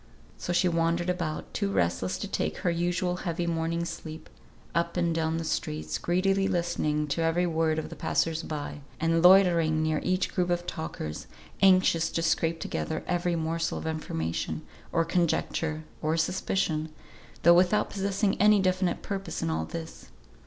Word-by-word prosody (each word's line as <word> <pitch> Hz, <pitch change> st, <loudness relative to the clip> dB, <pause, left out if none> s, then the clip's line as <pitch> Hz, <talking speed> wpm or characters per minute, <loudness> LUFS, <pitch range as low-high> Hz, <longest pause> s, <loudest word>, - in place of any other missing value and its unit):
So -, -, -4 dB
she 175 Hz, +1 st, +3 dB
wandered 170 Hz, +1 st, +1 dB
about, 170 Hz, -4 st, -4 dB
too 200 Hz, -2 st, -1 dB
restless 90 Hz, -, 0 dB
to -, -, -4 dB
take 80 Hz, 0 st, -2 dB
her 175 Hz, -, 0 dB
usual 175 Hz, +1 st, 0 dB
heavy 175 Hz, -1 st, -2 dB
morning's 170 Hz, 0 st, -1 dB
sleep, 155 Hz, 0 st, -8 dB, 0.4 s
up 170 Hz, +1 st, 0 dB
and 170 Hz, -1 st, +1 dB
down 160 Hz, 0 st, 0 dB
the 165 Hz, -, -2 dB
streets, 75 Hz, -, -2 dB
greedily 195 Hz, +2 st, +1 dB
listening 170 Hz, -4 st, 0 dB
to 165 Hz, -, 0 dB
every 165 Hz, +2 st, +2 dB
word 160 Hz, -2 st, +1 dB
of 160 Hz, -, -3 dB
the -, -, -8 dB
passers 165 Hz, -1 st, 0 dB
by, 150 Hz, -2 st, -5 dB, 0.2 s
and 165 Hz, +1 st, +2 dB
loitering 170 Hz, -4 st, +5 dB
near 155 Hz, -1 st, +1 dB
each 185 Hz, +1 st, 0 dB
group 180 Hz, -1 st, 0 dB
of 175 Hz, 0 st, 0 dB
talkers, 80 Hz, -, -5 dB, 0.3 s
anxious 185 Hz, -4 st, +5 dB
to 165 Hz, -, 0 dB
scrape 165 Hz, 0 st, +1 dB
together 75 Hz, -1 st, -3 dB
every 175 Hz, -1 st, 0 dB
morsel 165 Hz, +1 st, -1 dB
of -, -, -6 dB
information, 80 Hz, -, -3 dB, 0.3 s
or 165 Hz, -, +2 dB
conjecture, 160 Hz, -2 st, 0 dB, 0.2 s
or 155 Hz, +1 st, 0 dB
suspicion, 160 Hz, -2 st, 0 dB, 0.5 s
though 170 Hz, -, +8 dB
without 180 Hz, +4 st, +3 dB
possessing 195 Hz, 0 st, 0 dB
any 210 Hz, 0 st, +6 dB
definite 185 Hz, -1 st, 0 dB
purpose 195 Hz, -1 st, -4 dB
in 80 Hz, -, 0 dB
all 80 Hz, 0 st, -1 dB
this. 165 Hz, -, -8 dB
165 Hz, 160 wpm, -28 LUFS, 160-180 Hz, 0.5 s, though